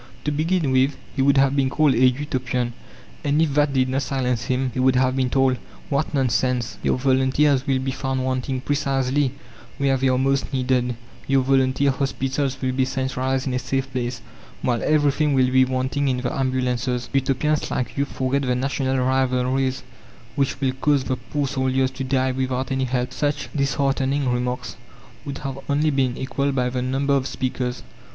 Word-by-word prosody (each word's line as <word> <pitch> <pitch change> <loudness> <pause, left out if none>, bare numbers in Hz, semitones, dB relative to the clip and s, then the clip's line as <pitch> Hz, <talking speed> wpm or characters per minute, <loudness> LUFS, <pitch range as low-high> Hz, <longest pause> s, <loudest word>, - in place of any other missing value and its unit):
To 150 - -1
begin 155 0 0
with, 130 +2 +2 0.2
he 135 - +1
would 140 +1 +4
have 135 0 +4
been 135 -2 +2
called 150 0 +3
a 120 +1 +2
Utopian, 125 -2 -1 0.5
and 145 0 +1
if 160 -3 +2
that 145 0 +3
did 130 -1 +2
not 130 +2 0
silence 125 -3 -1
him 130 0 0
he - - -3
would 130 0 +3
have 130 0 +2
been 130 -1 +1
told: 135 -1 +2 0.3
"What 140 +1 0
nonsense! 125 -3 0
Your - - +1
volunteers 130 +1 +2
will 135 -1 +2
be 130 0 -2
found 130 -1 -2
wanting 130 0 -2
precisely 135 -1 0 0.5
where 135 -1 +2
they 135 +1 +1
are 130 -1 +3
most 135 +1 +1
needed, 125 -2 0 0.3
your 135 -1 +3
volunteer 135 +1 +2
hospitals 135 0 -2
will 130 - +1
be 130 +1 +1
centralized 130 0 -1
in 130 - -2
a 125 - 0
safe 135 +1 -2
place, 120 -2 -3 0.4
while 120 -2 +1
everything 150 -1 +2
will 130 -1 +3
be 130 0 +5
wanting 130 +2 -1
in 130 -1 +1
the 125 -1 -2
ambulances. 125 -2 -1
Utopians 135 +3 +1
like 125 - -2
you 140 - +1
forget 135 0 -1
the 125 -2 0
national 135 +1 -1
rivalries 130 0 +1 0.5
which 135 -1 0
will 135 -2 +1
cause 145 -3 +3
the 130 - -1
poor 135 +4 -3
soldiers 130 -1 0
to 135 - -5
die 130 0 +1
without 130 0 -2
any 130 0 0
help." 125 0 -2
Such 145 +1 -1
disheartening 140 -1 +1
remarks 125 0 -2 0.5
would 140 -1 -5
have 135 0 -4
only 150 +2 +2
been 130 -3 0
equalled 140 +1 -1
by 125 -1 +1
the 125 0 -2
number 135 +2 0
of 135 -1 +1
speakers. 125 -1 -3
130 Hz, 180 wpm, -23 LUFS, 130-140 Hz, 0.5 s, be